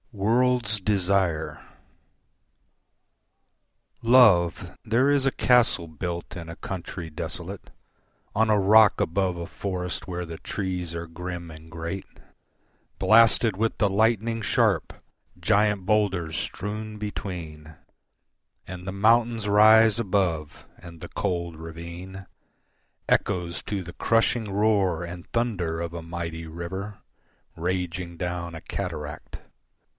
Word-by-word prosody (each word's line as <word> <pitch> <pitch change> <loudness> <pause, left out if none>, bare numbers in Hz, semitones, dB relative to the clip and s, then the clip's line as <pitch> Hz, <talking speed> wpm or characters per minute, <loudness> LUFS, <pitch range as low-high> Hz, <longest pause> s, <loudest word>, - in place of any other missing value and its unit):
World's 115 +1 +2
Desire 90 -6 0 2.4
Love, 100 -8 +4
there 120 +4 +2
is 140 -2 +2
a 135 - +3
castle 120 -11 +3
built 85 +2 -5
in 85 -2 -7
a 85 - -7
country 90 -2 -6
desolate, 85 +4 -6 0.7
On 110 +1 +3
a 105 -1 +4
rock 105 +2 +6
above 90 +1 0
a 85 - -4
forest 90 -2 -4
where 90 -1 -4
the 80 -1 -8
trees 90 -4 -4
are 85 0 -4
grim 85 0 -6
and 80 +1 -13
great, 85 +4 -5 0.9
Blasted 115 -1 +5
with 110 +3 -1
the 105 0 +2
lightning 115 +2 +1
sharp - - +1 0.5
giant 105 -2 +2
boulders 95 -6 +1
strewn 105 +2 -4
between, 85 -7 -6 0.9
And 90 0 -8
the 95 - -3
mountains 115 +2 +2
rise 110 +2 +6
above, 90 -8 -1
and 85 -1 -12
the 85 - -8
cold 85 -2 -2
ravine 85 +4 -9 0.8
Echoes 85 -4 0
to 100 -3 -3
the 90 0 -9
crushing 115 -1 +1
roar 100 -4 +2
and 85 0 -8
thunder 95 -9 -1
of 85 0 -4
a 85 - -5
mighty 80 -1 -5
river 95 +5 -6 0.6
Raging 90 0 -3
down 85 -1 -4
a 80 - -7
cataract. 80 -6 -6
90 Hz, 115 wpm, -25 LUFS, 85-105 Hz, 2.4 s, rock